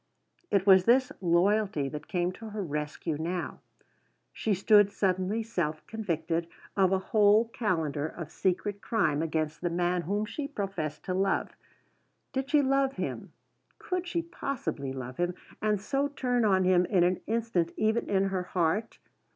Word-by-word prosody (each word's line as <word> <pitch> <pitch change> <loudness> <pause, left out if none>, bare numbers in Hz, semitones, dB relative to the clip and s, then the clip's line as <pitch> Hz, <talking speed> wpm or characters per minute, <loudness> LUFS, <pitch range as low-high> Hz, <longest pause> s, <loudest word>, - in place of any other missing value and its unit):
It 195 -2 +2
was 190 -2 +7
this 255 +2 +4
loyalty 180 -2 +2
that 150 +1 -7
came 175 0 0
to 220 +4 -9
her 210 -1 -4
rescue 150 -1 -3
now: 175 +2 -3 0.7
she 215 -2 0
stood 205 +1 +5
suddenly 195 +3 0
self 165 -8 -2
convicted 170 -6 -2 0.3
of 190 -2 +3
a 190 - +4
whole 210 +3 +4
calendar 160 - -1
of 170 -1 -8
secret 200 +2 -1
crime 160 -10 +1
against 155 -1 -2
the 175 - 0
man 175 +1 0
whom 205 +5 -1
she 280 +6 -4
professed 195 - -4
to 185 - -2
love. 195 +1 0 0.8
Did 270 +1 -2
she 290 -1 +4
love 270 0 +2
him? - - -5 0.5
Could 365 -1 -3
she 340 -1 -1
possibly 235 - -4
love 130 -1 -6
him, 175 0 0 0.3
and 210 -1 +1
so 275 +7 0
turn 250 -4 0
on 190 -2 +4
him 180 -1 +4
in 180 -1 +3
an 180 +1 +1
instant, 220 -7 0
even 220 +2 +1
in 195 -1 +2
her 190 -1 -1
heart? 180 +4 -1
190 Hz, 160 wpm, -29 LUFS, 170-220 Hz, 0.8 s, was